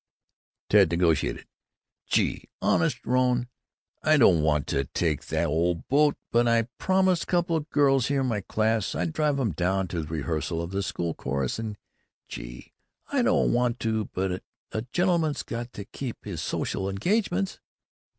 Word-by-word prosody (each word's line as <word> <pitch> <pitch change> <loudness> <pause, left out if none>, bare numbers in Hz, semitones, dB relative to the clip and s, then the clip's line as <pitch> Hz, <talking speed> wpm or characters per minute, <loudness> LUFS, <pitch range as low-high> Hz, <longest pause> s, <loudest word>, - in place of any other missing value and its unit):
Ted 100 -4 +5
negotiated: 85 -2 +1 0.6
"Gee, - - 0
honest, - - +1
Rone, 125 -1 +2 0.5
I 155 0 +4
don't 90 - +5
want 75 -1 +2
to 70 0 0
take 80 -1 -1
the - - 0
old 85 +3 0
boat, 145 +1 +4
but 120 +1 +3
I 115 0 +4 0.2
promised 185 -2 +2
couple 175 -2 +1
o' 155 -1 -5
girls 135 -4 +3
in 140 -2 +1
my 110 -5 -1
class 110 +1 0
I'd 165 - -1
drive 150 -3 +1
'em 120 -6 +1
down 90 +3 0
to 85 - -2
the 75 - -7
rehearsal 80 +2 -2
of 85 +1 -4
the 100 +1 -1
school 85 -4 -2
chorus, 65 - -2
and, 110 -2 -4 0.5
gee, - - -9 0.4
I - - +2
don't - - +3
want 120 0 +1
to, 110 -1 0
but 95 0 -3 0.3
a 110 - -2
gentleman's 170 -5 +1
got 120 0 -5
to 100 - -7
keep 130 +1 -7
his 90 -6 -4
social 95 +4 -2
engagements." 190 - 0
110 Hz, 160 wpm, -26 LUFS, 85-140 Hz, 0.6 s, Ted